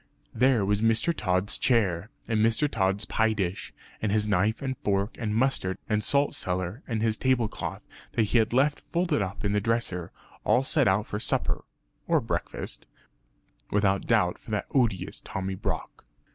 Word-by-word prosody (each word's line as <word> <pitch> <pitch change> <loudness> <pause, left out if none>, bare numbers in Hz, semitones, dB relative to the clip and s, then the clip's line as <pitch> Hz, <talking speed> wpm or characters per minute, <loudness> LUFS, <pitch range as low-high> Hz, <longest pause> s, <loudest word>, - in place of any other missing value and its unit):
There 125 -3 +3
was 105 +1 +1
Mr. 115 +9 +3
Tod's 95 -2 0
chair, 105 -6 +2 0.2
and 110 -2 +2
Mr. 115 +6 +3
Tod's 100 -4 0
pie 110 0 +2
dish, 95 -3 -3 0.3
and 110 - 0
his 105 0 +2
knife 105 +2 +2
and 130 -1 -2
fork 100 +2 0
and 105 -2 -1
mustard 115 -7 +1
and 105 -1 0
salt 140 0 +2
cellar 95 +5 -1
and 115 -3 -1
his 110 -1 +1
table 130 -3 +2
cloth - - -6 0.3
that 115 - +2
he 110 +3 +2
had 110 0 +1
left 140 +4 +2
folded 170 -7 +1
up 100 +2 -4
in 100 - +1
the 105 - +2
dresser 105 -6 -1 0.3
all 130 - +3
set 140 -1 +2
out 95 +3 +2
for 105 - -4
supper - - -1 0.4
(or - - +4
breakfast) - - -4 0.8
without 100 -1 +1
doubt - - +2
for - - -15
that - - -1
odious 115 -9 0
Tommy 95 0 -4
Brock. 95 - -4
110 Hz, 170 wpm, -27 LUFS, 100-120 Hz, 0.8 s, or